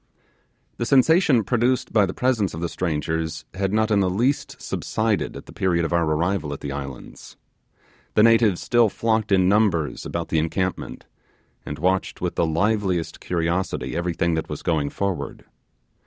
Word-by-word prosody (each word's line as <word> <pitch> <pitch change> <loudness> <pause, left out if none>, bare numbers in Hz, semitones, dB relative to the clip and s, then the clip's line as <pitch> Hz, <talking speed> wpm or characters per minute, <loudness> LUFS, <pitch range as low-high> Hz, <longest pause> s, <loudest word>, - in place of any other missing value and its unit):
The 120 - -2
sensation 140 - +4
produced 125 +3 0
by 105 -3 +4
the 95 - -4
presence 115 -9 0
of - - -6
the 85 0 -2
strangers 80 -2 -2
had 95 0 -1
not 110 +1 +1
in 105 - +4
the 95 -2 +2
least 120 +10 -1
subsided 110 -2 -2
at - - -10
the - - -13
period 90 -4 +1
of 85 - -2
our 85 -1 +2
arrival 80 0 0
at - - -8
the 70 - -4
islands. 70 -2 -8 0.8
The 105 - +6
natives 115 -5 +4
still 120 -2 +3
flocked 110 0 0
in 95 -2 +4
numbers 95 -7 +1
about 85 -1 -4
the 80 - +2
encampment, 90 +4 -3 0.6
and 75 - -4
watched 95 +4 0
with - - -2
the 85 - +1
liveliest 95 0 0
curiosity 85 -5 -2
everything 85 0 0
that 80 0 -2
was - - -6
going 75 -4 0
forward. 90 -8 -4
95 Hz, 165 wpm, -23 LUFS, 80-110 Hz, 0.8 s, The